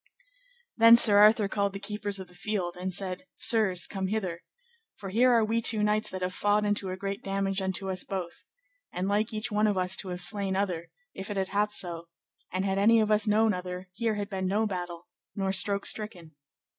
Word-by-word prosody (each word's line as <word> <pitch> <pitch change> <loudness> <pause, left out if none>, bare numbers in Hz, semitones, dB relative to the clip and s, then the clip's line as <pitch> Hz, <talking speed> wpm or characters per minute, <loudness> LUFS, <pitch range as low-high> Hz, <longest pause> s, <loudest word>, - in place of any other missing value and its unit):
Then 230 0 +8
Sir 210 -3 +7
Arthur 210 0 +5
called 200 -1 -1
the 195 - -6
keepers 205 0 -4
of 190 - -8
the 180 - -19
field, 180 -2 -3
and 185 +1 -4
said, 190 +7 -6
Sirs, 210 -6 +2
come 190 -1 -4
hither, 185 -5 -3 0.5
for 195 - -8
here 245 +6 +3
are 230 -2 +3
we 225 +2 0
two 220 -2 +2
knights 210 +1 +1
that 185 -1 -5
have 180 0 -2
fought 205 +2 +1
unto 205 -2 -1
a 185 - -5
great 195 +1 -5
damage 195 0 -2
unto 190 +1 -3
us 185 -1 -2
both, 180 -3 -6 0.5
and 180 +2 -3
like 210 +2 0
each 220 +2 -3
one 210 +1 +2
of 205 -2 0
us 185 0 +1
to 195 - -1
have 180 0 -2
slain 195 +1 +1
other, 180 -4 -2 0.2
if 195 - -8
it 205 - -4
had 190 -1 -1
happed 210 +1 0
so; 170 -2 -2 0.4
and 185 +2 -2
had 195 0 0
any 225 +3 +5
of 215 -1 +1
us 215 +1 +2
known 215 +1 +3
other, 180 0 -6
here 225 +1 -1
had 205 -1 -4
been 190 -2 -3
no 210 +4 +1
battle, 175 -4 -5 0.3
nor 195 -1 -1
stroke 200 +1 +2
stricken. 180 -7 -3
200 Hz, 215 wpm, -28 LUFS, 185-210 Hz, 0.5 s, Then